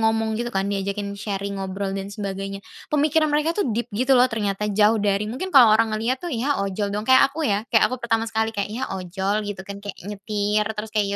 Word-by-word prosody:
ngomong 220 Hz, 0 st, +1 dB
gitu 240 Hz, +1 st, -3 dB
kan, 195 Hz, 0 st, 0 dB
diajakin 200 Hz, 0 st, -3 dB
sharing 200 Hz, -1 st, -4 dB
ngobrol 195 Hz, +1 st, -3 dB
dan 195 Hz, 0 st, -5 dB
sebagainya. 195 Hz, -1 st, -5 dB, 0.3 s
Pemikiran 305 Hz, +1 st, +3 dB
mereka 305 Hz, +4 st, +1 dB
tuh 410 Hz, -, +1 dB
deep 235 Hz, +2 st, -2 dB
gitu 255 Hz, +5 st, +2 dB
loh 250 Hz, -, +6 dB
ternyata 210 Hz, -2 st, -2 dB
jauh 210 Hz, +2 st, +3 dB
dari 200 Hz, 0 st, +1 dB
mungkin 325 Hz, +11 st, -4 dB
kalau 235 Hz, -5 st, +8 dB
orang 225 Hz, 0 st, +2 dB
ngelihat 235 Hz, +4 st, -1 dB
tuh 350 Hz, -, -5 dB
ya 275 Hz, +5 st, 0 dB
ojol 200 Hz, +1 st, -2 dB
dong, 210 Hz, +1 st, -3 dB
kayak 260 Hz, +1 st, +7 dB
aku 315 Hz, +1 st, -2 dB
ya 205 Hz, +1 st, +1 dB
kayak 225 Hz, -, +6 dB
aku 255 Hz, -, -3 dB
pertama 225 Hz, -1 st, +1 dB
sekali 220 Hz, 0 st, 0 dB
kayak 200 Hz, -1 st, -2 dB
ya 245 Hz, -, -4 dB, 0.2 s
ojol 190 Hz, +3 st, -2 dB
gitu 195 Hz, -2 st, -5 dB
kan, 200 Hz, +1 st, -7 dB
kayak 205 Hz, -1 st, -7 dB
nyetir 210 Hz, 0 st, -1 dB
terus 215 Hz, +1 st, -5 dB
kayak 210 Hz, -2 st, +1 dB
210 Hz, 220 wpm, -23 LUFS, 200-235 Hz, 0.3 s, kalau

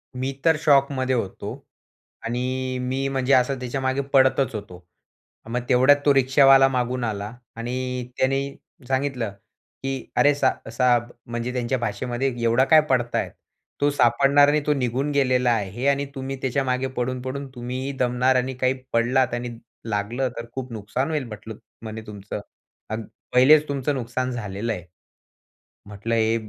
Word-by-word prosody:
मी 130 Hz, +2 st, -2 dB
तर 160 Hz, -1 st, +5 dB
शॉकमध्ये 135 Hz, -3 st, +3 dB
होतो. 100 Hz, -5 st, -4 dB, 0.6 s
आणि 130 Hz, +2 st, -2 dB
मी 130 Hz, +2 st, -1 dB
म्हणजे 135 Hz, 0 st, +1 dB
असं 130 Hz, +1 st, +3 dB
त्याच्यामागे 130 Hz, +2 st, -1 dB
पळतच 130 Hz, -1 st, +4 dB
होतो. 90 Hz, -4 st, -8 dB, 0.6 s
मग 125 Hz, +1 st, -1 dB
तेवढ्यात 130 Hz, +3 st, +6 dB
तो 145 Hz, -, +6 dB
रिक्षावाला 135 Hz, 0 st, +6 dB
मागून 125 Hz, -1 st, -1 dB
आला 105 Hz, 0 st, -3 dB, 0.2 s
आणि 125 Hz, +1 st, -3 dB
त्याने 135 Hz, +1 st, +2 dB, 0.5 s
सांगितलं 130 Hz, -5 st, -1 dB, 0.5 s
की 135 Hz, -2 st, -3 dB
"अरे, 145 Hz, 0 st, +5 dB
साह 145 Hz, -, 0 dB
साहब." 120 Hz, -1 st, +2 dB
म्हणजे 120 Hz, +1 st, -4 dB
त्यांच्या 125 Hz, +1 st, -1 dB
भाषेमध्ये 120 Hz, +4 st, -2 dB
एवढा 115 Hz, +3 st, +4 dB
काय 155 Hz, +1 st, +7 dB
पळतायेत, 120 Hz, -2 st, 0 dB, 0.5 s
तो 145 Hz, -, +4 dB
सापडणार 140 Hz, +2 st, +4 dB
नाही, 150 Hz, +1 st, +2 dB
तो 150 Hz, -, +3 dB
निघून 135 Hz, +1 st, -1 dB
गेलेला 125 Hz, -3 st, +2 dB
आहे 110 Hz, +4 st, -1 dB
आणि 140 Hz, 0 st, +2 dB
तुम्ही 135 Hz, 0 st, -4 dB
त्याच्यामागे 130 Hz, 0 st, 0 dB
पळून-पळून, 130 Hz, +3 st, -3 dB
तुम्हीही 125 Hz, +3 st, -4 dB
दमणार 125 Hz, +1 st, +2 dB
आणि 130 Hz, +1 st, 0 dB
काही 130 Hz, 0 st, +1 dB, 0.2 s
पडलात 120 Hz, +2 st, +2 dB
आणि 120 Hz, 0 st, -3 dB, 0.4 s
लागलं 115 Hz, +6 st, -1 dB
तर 115 Hz, -, -5 dB
खूप 130 Hz, -2 st, -5 dB
नुकसान 115 Hz, +7 st, -2 dB
होईल 150 Hz, -3 st, -1 dB
म्हटलं 110 Hz, 0 st, -8 dB, 0.3 s
म्हणे 110 Hz, 0 st, -6 dB
तुमचं 105 Hz, 0 st, -6 dB, 0.5 s
आणि 110 Hz, +1 st, -3 dB, 0.3 s
पहिलेच 145 Hz, +4 st, +6 dB
तुमचं 140 Hz, 0 st, -1 dB
नुकसान 130 Hz, +1 st, -2 dB
झालेलं 115 Hz, -1 st, -3 dB
आहे." 90 Hz, -4 st, -7 dB, 1.0 s
म्हटलं 105 Hz, +3 st, -3 dB
हे, 110 Hz, 0 st, +2 dB
125 Hz, 145 wpm, -24 LUFS, 120-135 Hz, 1.0 s, काय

